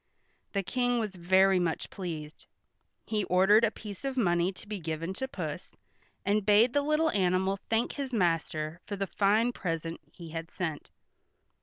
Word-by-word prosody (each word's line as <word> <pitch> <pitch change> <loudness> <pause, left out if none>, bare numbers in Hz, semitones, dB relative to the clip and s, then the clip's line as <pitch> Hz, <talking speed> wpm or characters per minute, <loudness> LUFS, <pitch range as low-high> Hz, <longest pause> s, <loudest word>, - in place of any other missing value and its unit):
The 200 -1 0
King 245 +5 0
was 215 -4 -2
very 190 +2 +4
much 170 -2 -2
pleased. 160 -5 -6 0.6
He 215 -2 0
ordered 195 +5 +5
a 230 - +5
piece 210 0 -9
of 270 -1 -3
money 175 -5 +2
to 195 - -12
be 210 -1 -4
given 165 +2 -3
to 265 +7 -4
Puss, 280 - -6 0.5
and 205 +1 +2
bade 215 +5 +5
the 285 - +3
little 305 +2 +2
animal 190 0 +1
thank 225 +1 +1
his 275 -2 -4
master 165 -5 0
for 205 - -3
the 195 0 -1
fine 215 +5 +2
present 165 -4 -3
he 170 -2 -10
had 165 +1 -5
sent. 160 -5 -4
195 Hz, 165 wpm, -30 LUFS, 175-225 Hz, 0.6 s, ordered